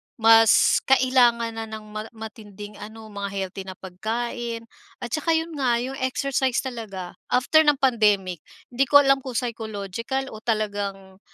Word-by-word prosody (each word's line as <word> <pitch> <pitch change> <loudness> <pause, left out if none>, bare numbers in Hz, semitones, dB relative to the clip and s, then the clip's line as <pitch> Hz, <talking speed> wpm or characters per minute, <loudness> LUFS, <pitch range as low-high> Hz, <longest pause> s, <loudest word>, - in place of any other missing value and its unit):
mas 225 -1 +6
kailangan 250 -3 +4
na 225 0 -6
ng 220 -1 -8
ma 215 +1 -6
matinding 210 -2 -10
ano, 220 +1 -10
mga 200 -1 -4
healthy 190 0 -5
na 185 - -7
pagkain 230 +5 -4 0.3
at 240 - -7
saka 310 +2 -1
'yon 325 +1 -2
nga, 255 -5 +1
'yong 250 +3 -3
exercise 260 -1 0
talaga. 215 -8 -6 0.2
After 255 +5 +4
ng 295 -2 +3
pandemic, 210 - +2 0.3
hindi 265 +3 +2
ko 285 - +8
alam 275 0 +4
kung 255 -2 -7
psychological 230 +2 -4
o 215 - -8
talagang 200 -4 -3
225 Hz, 150 wpm, -24 LUFS, 205-255 Hz, 0.3 s, ko